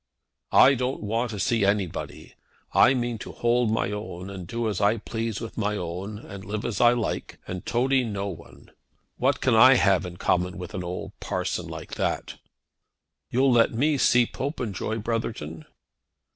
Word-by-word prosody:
"I 135 - +8
don't 125 -2 -2
want 115 +4 -1
to 105 -3 -5
see 115 +1 +1
anybody. 100 -3 -2 0.4
I 130 - +6
mean 120 -2 -2
to - - -7
hold 120 0 +1
my 110 -2 0
own, 100 -3 -6
and 95 -3 -7
do 115 +2 -2
as 105 -2 -2
I 105 +3 +3
please 115 0 -3
with 115 0 -6
my 105 -1 0
own, 90 +4 -5
and 100 -3 -10
live 105 +2 -4
as 105 - -2
I 120 0 +7
like, 120 -2 -3
and 90 -1 -5
toady 130 +2 +2
no 100 -4 -3
one. 90 -6 -11 0.5
What 135 +3 +1
can 130 - +2
I 130 +4 +8
have 100 -5 +3
in 90 0 -9
common 90 +2 0
with 90 -1 -7
an 90 - -4
old 90 +1 -5
parson - - -3
like - - -8
that?" - - -2 0.9
"You'll 130 +2 +3
let 115 -1 +4
me 145 +4 +2
see 125 -1 +5
Popenjoy, 115 - -3
Brotherton?" 105 -9 -3
110 Hz, 170 wpm, -26 LUFS, 100-120 Hz, 0.9 s, I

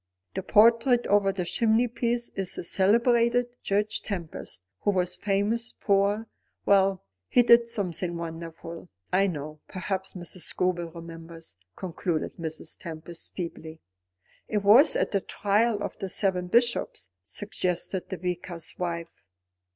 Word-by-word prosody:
The - - -2
portrait 230 +5 +5
over 200 -1 +3
the 185 -2 -3
chimneypiece 235 +3 +1
is 190 -2 -2
the - - -5
celebrated 235 +6 +3
Judge 210 +2 0
Tempest, 170 - -5 0.2
who - - 0
was 180 -2 +1
famous 210 +4 -1
for 200 +2 +2 0.4
Well, 195 -1 +4 0.2
he 245 - +5
did 235 0 +6
something 180 -6 -1
wonderful, 165 0 -7 0.2
I 195 +2 +4
know. 155 -3 -5
Perhaps 190 0 -4
Mrs. 180 0 -6
Scobel 175 -1 -1
remembers," 165 - -10 0.2
concluded 175 -3 -3
Mrs. 160 -1 -5
Tempest, 165 -2 -7
feebly. 160 -2 -6 0.7
"It 210 -2 -1
was 235 +10 +7
at - - +1
the 200 - +1
trial 205 +2 +1
of - - -5
the 195 - -3
seven 185 -2 0
bishops," 235 - +1
suggested 185 - -3
the 190 - -4
Vicar's 175 -1 -4
wife. 170 -2 -3
190 Hz, 130 wpm, -27 LUFS, 170-215 Hz, 0.7 s, was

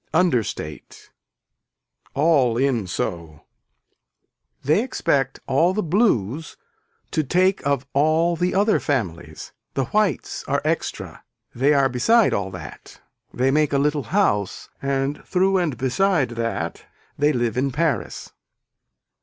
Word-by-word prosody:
Understate. 120 - -1 1.0
All 140 -6 +3
in 125 -6 +1
so. 85 -3 -5 1.2
They 155 +9 +3
expect 140 - -1
all 165 +8 +2
the 215 - 0
blues 160 - 0 0.5
to 155 - 0
take 185 +6 +1
of 140 -2 0
all 155 +4 +2
the 180 +2 -1
other 205 +2 +3
families, 85 - -3 0.2
the 135 - 0
whites 205 - -1
are - - 0
extra - - -3 0.3
they 135 +4 +2
are 135 -1 +4
beside 205 - +3
all 100 -1 -1
that, 90 -5 -10 0.3
they 130 +2 +1
make 150 0 +2
a - - +3
little 145 +1 0
house 105 - 0
and 140 +1 -1
through 190 +1 +2
and 155 -8 -1
beside 145 - +1
that 115 -1 -3 0.4
they 145 +1 +4
live 120 -5 -1
in 135 +2 +1
Paris. 150 +3 -2
140 Hz, 120 wpm, -22 LUFS, 120-170 Hz, 1.2 s, are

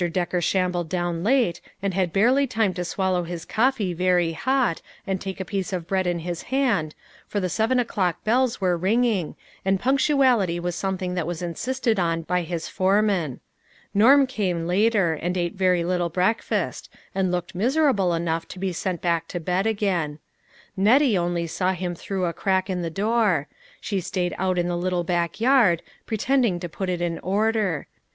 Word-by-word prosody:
Decker 180 0 -1
shambled 180 -2 0
down 175 -1 -2
late, 235 -5 +2 0.2
and 195 -1 -2
had 185 -2 0
barely 250 +9 +3
time 220 -6 +1
to 180 - -3
swallow 185 0 0
his 170 -1 -6
coffee 225 -5 +1
very 180 -1 +2
hot, 250 - 0 0.2
and 195 -2 -2
take 190 0 -5
a 190 - -3
piece 195 0 -3
of 180 -3 -3
bread 190 +1 0
in 175 -1 0
his 175 -2 -3
hand, 235 - +1 0.3
for 205 - -2
the 185 -2 -1
seven 225 +7 +1
o'clock 195 -7 -1
bells 245 +2 +1
were 185 -2 +2
ringing, 200 -1 +1 0.3
and 195 0 +1
punctuality 255 - +2
was 175 0 -3
something 185 -1 -2
that 180 -3 -2
was 175 0 -4
insisted 230 +6 -1
on 165 -2 0
by 180 +2 0
his 170 -1 -4
foreman. 190 - +1 0.5
Norm 270 +7 +6
came 190 -10 -2
later, 195 -1 +2
and 175 +4 -3
ate 175 -1 -1
very 185 -2 +2
little 175 0 0
breakfast, 185 +7 -1 0.2
and 190 -2 0
looked 180 +1 -3
miserable 220 - +2
enough 165 0 -2
to - - -10
be 190 0 -2
sent 175 0 -3
back 170 -1 0
to 175 - -4
bed 180 +5 0
again. 185 -9 -1 0.6
Nettie 230 +5 +4
only 175 -1 0
saw 185 +3 0
him 180 -1 -3
through 185 +2 -3
a 170 - -1
crack 190 +1 0
in 180 -1 -2
the 170 - -2
door; 200 -4 +1 0.3
she 200 -2 -2
stayed 180 -1 -2
out 185 -1 0
in 175 0 +1
the 175 - -1
little 180 0 -1
back 170 +1 -1
yard, 230 -9 +4 0.2
pretending 230 -3 +1
to 175 - -4
put 185 +3 -4
it 175 -1 -2
in 170 -1 -2
order. 205 -3 0
185 Hz, 180 wpm, -24 LUFS, 175-215 Hz, 0.6 s, Norm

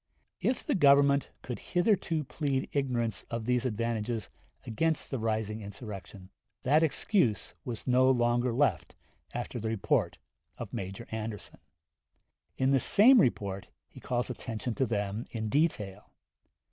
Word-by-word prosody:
If 250 0 -1
the - - +1
Government 140 -4 +5
could 125 - -5
hitherto 175 -4 +1
plead 140 -1 -2
ignorance 120 -7 0
of 115 -1 -4
these 125 0 +1
advantages 115 -1 -2 0.4
against 160 +8 -1
the 135 - -2
rising 110 -1 -2
insurrection, 100 -2 -9 0.3
that 150 +5 +4
excuse 160 - +1
was 115 -3 -5
no 130 0 +4
longer 120 -1 +2
left 120 - 0 0.4
after 120 0 -4
the 110 0 -2
report 110 -3 0 0.4
of - - -7
Major 95 +4 -5
Anderson. 110 -2 -5 1.0
In 130 +1 +2
this 135 -2 +3
same 240 +3 +7
report 100 - -1 0.2
he - - -14
calls 125 0 -2
attention 115 -1 -4
to 130 +2 0
them 105 0 -2
in 110 -2 -4
detail. 105 - 0
120 Hz, 135 wpm, -30 LUFS, 110-140 Hz, 1.0 s, same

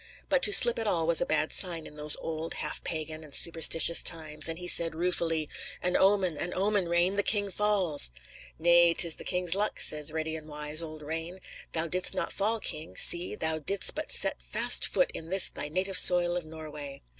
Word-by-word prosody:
But - - 0
to 415 - +7
slip 240 -11 +8
at 225 - -4
all 165 -5 -1
was 170 0 +1
a - - -3
bad 155 0 0
sign 170 -4 0
in - - -13
those 150 0 -2
old, 160 0 -7
half - - -6
pagan, 155 -1 -4
and 150 -2 -6
superstitious 165 0 +2
times, 155 -1 0
and 165 - -3
he 180 0 -9
said, 165 -2 +4
ruefully: 165 -2 -2 0.3
"An 180 0 -3
omen; 190 -5 0
an 175 - -4
omen, 195 -2 -2
Rane! 175 +2 0
The 200 - 0
king 205 -1 +1
falls!" 190 - 0 0.5
"Nay,'tis 170 0 +2
the - - -11
king's 180 -2 -1
luck," 205 +2 -2
says 150 0 +1
ready 160 0 -5
and 155 -1 -11
wise 150 +1 -3
old 155 -2 -11
Rane. 165 +4 -7 0.3
"Thou 165 0 -2
didst 180 +2 +1
not - - -5
fall, 220 +3 -2
king. 155 -5 -5
See; 175 +1 +5
thou 160 0 -2
didst 195 +6 -1
but - - -7
set - - +1
fast - - +1
foot - - -1
in 165 - -9
this 190 0 +4
thy - - -5
native 185 +4 +1
soil 175 -1 +4
of 175 -2 -6
Norway." 150 -3 -11
170 Hz, 200 wpm, -26 LUFS, 155-185 Hz, 0.5 s, slip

